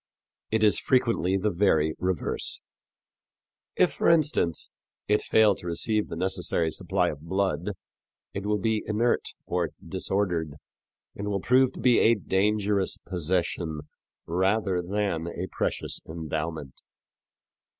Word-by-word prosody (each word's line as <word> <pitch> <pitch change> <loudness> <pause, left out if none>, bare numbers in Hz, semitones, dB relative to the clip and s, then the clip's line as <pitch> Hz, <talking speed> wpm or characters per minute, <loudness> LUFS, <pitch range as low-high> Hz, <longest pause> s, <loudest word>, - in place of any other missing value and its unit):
It 110 0 +1
is 105 - +4
frequently 115 -7 +2
the 105 +2 0
very 80 -5 +2
reverse. 90 -3 -2 1.2
If, - - +3
for - - +2
instance, 150 - +2 0.4
it 105 +1 +3
fail 110 -2 +4
to 90 - -9
receive 105 +5 0
the - - -5
necessary 90 -2 0
supply 90 0 0
of 75 - -10
blood, 95 +1 -1 0.6
it 100 - -4
will 105 0 +2
be 110 +1 0
inert 110 +3 0
or 85 -2 -1 0.2
disordered 85 -7 -1 0.6
and 100 - -5
will 100 -1 0
prove 130 +5 +3
to - - -9
be 125 -2 +4
a 115 - +5
dangerous 100 0 0
possession 85 -3 -1 0.4
rather 95 +2 +1
than 90 -3 -2
a 85 +1 -4
precious - - -2
endowment. 80 -3 -5
95 Hz, 125 wpm, -27 LUFS, 85-105 Hz, 1.2 s, a